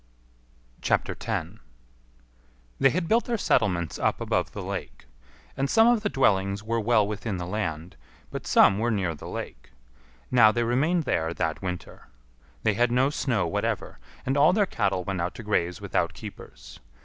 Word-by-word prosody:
10. - - -2 1.2
They 135 - +5
had 170 +5 -1
built 230 +5 +3
their 235 -1 -1
settlements 90 - +1
up - - +1
above - - -1
the - - -6
lake. - - -6 0.5
And 135 +1 -1
some 225 +7 +5
of 240 -2 +4
the 210 - -1
dwellings 100 - +1
were 115 +1 -1
well 110 -2 +3
within 105 -1 -4
the 90 - -4
land, 85 - -4 0.3
but - - -6
some 100 +1 +5
were 115 +2 +1
near 95 -6 0
the 75 - -9
lake. - - -7 0.6
Now 115 -4 +7
they 120 +1 0
remained 150 +9 +1
there 80 - -1
that 80 -1 -2
winter. 90 -2 -6 0.6
They 110 - +3
had 120 +3 +2
no 130 +3 +3
snow 120 -10 0
whatever, 80 - -2 0.3
and 135 - 0
all 150 +5 +5
their 205 0 +3
cattle 100 - -1
went 95 -1 -3
out 85 +2 -3
to 120 - -8
graze 90 -4 0
without - - -1
keepers. - - -11
110 Hz, 165 wpm, -26 LUFS, 90-135 Hz, 1.2 s, Now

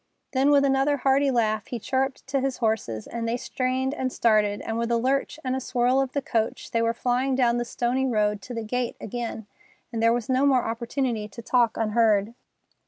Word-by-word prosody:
Then 270 +2 +3
with 285 -1 +5
another 275 +1 +2
hearty 275 +1 +2
laugh 220 -4 0
he 245 - -4
chirruped 265 +4 -2
to 270 0 -1
his 265 -1 -1
horses, 220 - -1
and 230 -1 -4
they 235 +1 0
strained 260 +2 -1
and 260 -2 -2
started, 210 -4 +2
and 225 +1 -3
with 235 0 -1
a 235 - +2
lurch 270 +5 0
and 255 -1 -1
a - - -1
swirl 255 +1 +1
of 265 -1 -3
the 280 - -1
coach 225 -2 -2
they 230 - +1
were 230 0 +2
flying 255 +2 0
down 240 -2 +2
the 240 - -1
stony 250 +3 -1
road 210 -4 +1
to 245 +4 -8
the 230 - -3
gate 245 +2 -2
again, 230 0 -5 0.5
and 225 - -2
there 230 0 +5
was 235 -2 -1
no 260 +1 +2
more 265 -3 +4
opportunity 230 -1 -2
to 235 +2 -11
talk 240 -1 +2
unheard. 220 -1 +2
240 Hz, 210 wpm, -25 LUFS, 225-265 Hz, 0.5 s, with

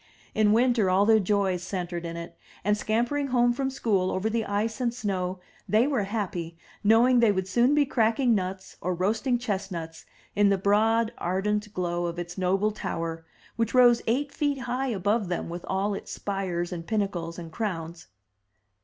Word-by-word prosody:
In 215 -1 +3
winter 235 -3 +3
all 190 +2 +4
their 220 0 +5
joys 195 -2 +1
centered 175 -2 -4
in 165 0 -6
it, 170 0 -8 0.3
and 210 +2 +2
scamp 220 +3 0
ering 290 -1 -1
home 245 -2 +3
from 265 +2 -1
school 215 -9 0
over 205 +4 -1
the 230 0 0
ice 220 +4 -2
and 240 -2 +1
snow, 190 -6 -3 0.3
they 220 +3 +4
were 265 -8 0
happy, 180 -6 -4 0.3
knowing 235 +4 +5
that 235 - +5
they - - +5
would 190 -2 -1
soon 240 +8 +3
be 295 -1 +4
cracking 235 0 +2
nuts 190 -1 -3
or 180 0 -1
roasting 220 +8 +1
chest 205 -5 -3
nuts 165 -2 -7 0.3
in 205 0 +4
the 200 - +3
broad 220 +4 +2
ardent 210 +4 -1
glow 175 -1 -1
of 170 0 -5
its 175 0 -5
noble 195 +3 +1
tower, 165 -5 -4 0.3
which 230 +1 0
rose 245 -2 +6
eight 275 +5 0
feet 285 -3 -1
high 250 +3 -2
above 205 -1 0
them 175 -1 -3
with 175 +1 -6
all 195 +2 0
its 195 - -6
spires 185 -3 -3
and 165 -1 -7
pinnacles 190 -6 -2
and 165 -2 -8
crowns. 170 -5 -4
205 Hz, 185 wpm, -27 LUFS, 180-230 Hz, 0.3 s, rose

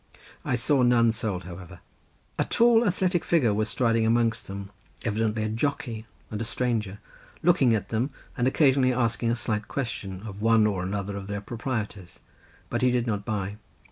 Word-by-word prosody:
I - - 0
saw 130 +3 +2
none 120 -2 +5
sold, 105 -5 -3
however. 90 0 -10 0.6
A - - +3
tall 235 0 +4
athletic 180 -2 +1
figure 135 -11 +3
was 110 +1 0
striding 115 -2 +2
amongst 115 0 +1
them, 100 0 -7 0.3
evidently 110 0 0
a 110 - -1
jockey 115 -2 -2 0.2
and 105 0 -3
a - - 0
stranger, 115 -4 -1 0.5
looking 140 -9 +4
at 100 -2 -3
them 115 +5 0 0.3
and 125 0 +1
occasionally 130 -2 +4
asking 115 -1 0
a 120 - +2
slight 110 -3 -2
question 100 -7 -4
of 105 -1 -8
one 115 -1 +4
or 100 -4 0
another 100 +2 -3
of 100 -1 -6
their 100 0 -3
proprietors, 105 -4 -5 0.5
but - - -2
he 130 - +4
did 125 -1 +1
not 105 -4 -2
buy. 105 -2 -3
115 Hz, 175 wpm, -26 LUFS, 105-125 Hz, 0.6 s, none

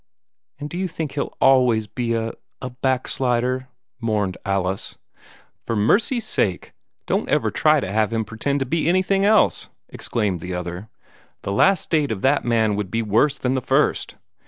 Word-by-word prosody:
"And 145 - -5
do 170 - -7
you 190 - 0
think 160 -4 -5
he'll 140 - -4
always 125 -5 +4
be 115 +2 -2
a 115 0 -2 0.3
a 130 - -6
back 130 +1 -1
slider," 130 0 0 0.3
mourned 105 -5 -1
Alice. 95 -1 -2 0.7
"For 115 - -2
mercy's 220 - +2
sake, 95 - -1 0.3
don't - - -1
ever - - +1
try - - +3
to 95 - -4
have 110 +1 +1
him 115 -1 -1
pretend 135 +6 -2
to - - +1
be 160 +4 0
anything 190 +2 +2
else!" 215 +1 +3 0.2
exclaimed 100 -6 -2
the 90 +2 -5
other. 90 +4 -6 0.5
"The - - -3
last 190 - +4
state 150 -5 0
of 100 -3 -3
that 140 +2 +2
man 110 -3 +2
would 105 -3 -3
be 115 +3 -1
worse 115 +8 +2
than 125 0 -1
the 130 - 0
first. 125 - +1
120 Hz, 175 wpm, -22 LUFS, 105-140 Hz, 0.7 s, always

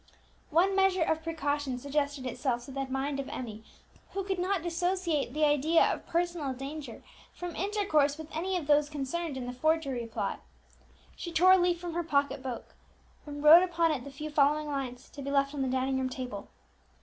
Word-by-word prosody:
One 365 +5 +3
measure 385 -2 +3
of 320 0 0
precaution 290 -5 -2
suggested 280 0 -2
itself 245 -1 -2
to 275 - -10
the 270 0 -3
mind 270 +2 -2
of 275 - -4
Emmie, 220 -3 -6 0.5
who 390 - -2
could 380 -1 -2
not 370 -1 0
dissociate 345 -4 0
the 305 0 +3
idea 295 +3 +4
of - - -2
personal 340 -5 -1
danger 275 -1 -7 0.3
from 355 -2 -6
intercourse 335 -7 +1
with 315 0 -9
any 370 +4 -1
of 335 - -4
those 295 0 +3
concerned 295 +1 -3
in 255 - -4
the 250 - -5
forgery 275 -4 0
plot. 225 - -3 0.8
She 345 - -6
tore 355 +3 +5
a 375 - +8
leaf 350 -1 +2
from 350 -1 -5
her 345 - 0
pocket 285 -4 0
book, 255 -3 -6 0.5
and 290 0 -6
wrote 315 +3 +10
upon 340 -3 +2
it 270 -5 -2
the 280 - -8
few 300 +3 -7
following 295 +1 +3
lines, 260 -3 -4
to 285 - -9
be 280 - -4
left 275 0 +2
on 285 - -3
the 265 - 0
dining 260 +1 0
room 260 0 -1
table. 250 -6 -6
295 Hz, 195 wpm, -30 LUFS, 270-340 Hz, 0.8 s, wrote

